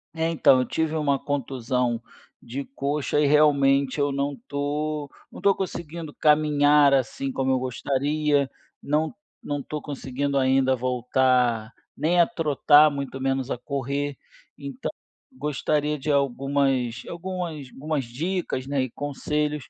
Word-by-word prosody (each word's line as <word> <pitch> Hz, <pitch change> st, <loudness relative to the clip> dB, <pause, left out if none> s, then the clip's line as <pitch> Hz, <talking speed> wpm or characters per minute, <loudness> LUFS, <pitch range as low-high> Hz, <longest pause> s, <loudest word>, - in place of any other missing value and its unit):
É 165 Hz, 0 st, 0 dB
então, 150 Hz, -5 st, +5 dB
eu 125 Hz, -, +1 dB
tive 160 Hz, +2 st, -1 dB
uma 145 Hz, -3 st, +1 dB
contusão 125 Hz, -4 st, -1 dB, 0.4 s
de 135 Hz, +4 st, -6 dB
coxa 140 Hz, +2 st, -1 dB
e 150 Hz, -, +4 dB
realmente 140 Hz, -2 st, +4 dB
eu 145 Hz, 0 st, +2 dB
não 140 Hz, +1 st, -1 dB
estou 145 Hz, +3 st, -3 dB, 0.2 s
não -, -, -10 dB
estou 200 Hz, -1 st, +3 dB
conseguindo 170 Hz, -4 st, -5 dB
caminhar 150 Hz, -1 st, +4 dB
assim 135 Hz, +1 st, 0 dB
como 130 Hz, 0 st, 0 dB
eu 130 Hz, -, +2 dB
gostaria, 140 Hz, +3 st, 0 dB, 0.3 s
não 155 Hz, +2 st, 0 dB, 0.3 s
não 145 Hz, 0 st, -3 dB
estou 150 Hz, +2 st, -5 dB
conseguindo 140 Hz, 0 st, -3 dB
ainda 130 Hz, 0 st, +3 dB
voltar 125 Hz, -2 st, +1 dB, 0.2 s
nem 165 Hz, +4 st, +1 dB
a 170 Hz, -, +6 dB
trotar, 150 Hz, -4 st, +4 dB
muito 140 Hz, -1 st, -5 dB
menos 135 Hz, -1 st, -1 dB
a -, -, -2 dB
correr. 140 Hz, +2 st, -3 dB, 0.4 s
Então, 140 Hz, -2 st, -5 dB, 0.4 s
gostaria 150 Hz, +2 st, -1 dB
de 150 Hz, +2 st, -2 dB
algumas 135 Hz, -3 st, 0 dB
algumas 170 Hz, -5 st, -5 dB
algumas 150 Hz, 0 st, -2 dB
dicas, 140 Hz, +1 st, -3 dB
né, 140 Hz, -1 st, 0 dB
e 130 Hz, -, -3 dB
conselhos 150 Hz, +1 st, -2 dB
140 Hz, 135 wpm, -25 LUFS, 130-150 Hz, 0.4 s, a